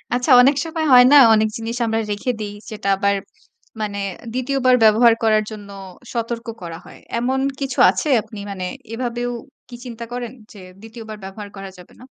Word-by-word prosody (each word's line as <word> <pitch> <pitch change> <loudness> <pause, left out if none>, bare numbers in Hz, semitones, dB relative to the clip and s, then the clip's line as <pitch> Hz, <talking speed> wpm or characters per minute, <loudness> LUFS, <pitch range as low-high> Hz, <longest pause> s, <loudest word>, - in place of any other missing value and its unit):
আচ্ছা, 250 +3 0
অনেক 275 +3 +4
সময় 320 -1 -3
হয় 245 0 +9
না? - - +9 0.2
অনেক 215 0 +2
জিনিস 225 +1 -5
আমরা 225 0 0
রেখে 205 +5 -2
দেই। 205 -1 -5 0.2
যেটা 210 -2 -4
আবার 200 +1 +1 0.7
মানে 200 -1 -3 0.3
দ্বিতীয় 255 +2 -2
বার 255 - +6
ব্যবহার 225 +2 +6
করার 215 -1 +3
জন্য 205 -2 -10 0.4
সতর্ক 235 0 -4 0.2
করা 165 -1 -7
হয়। - - -14 0.2
এমন 260 +3 0 0.2
কিছু 270 -2 -3
আছে 305 - -2
আপনি 215 - -11
মানে 185 -2 -5 0.3
এভাবেও 245 0 -3 0.4
কি 245 - -9
চিন্তা 235 -1 -7
করেন? 245 -2 -5 0.2
যে 205 - -13 0.2
দ্বিতীয়বার 220 -1 -10
ব্যবহার 200 +2 -8
করা 195 0 -7
যাবে 180 - -15
না? - - -22
225 Hz, 180 wpm, -20 LUFS, 210-245 Hz, 0.7 s, হয়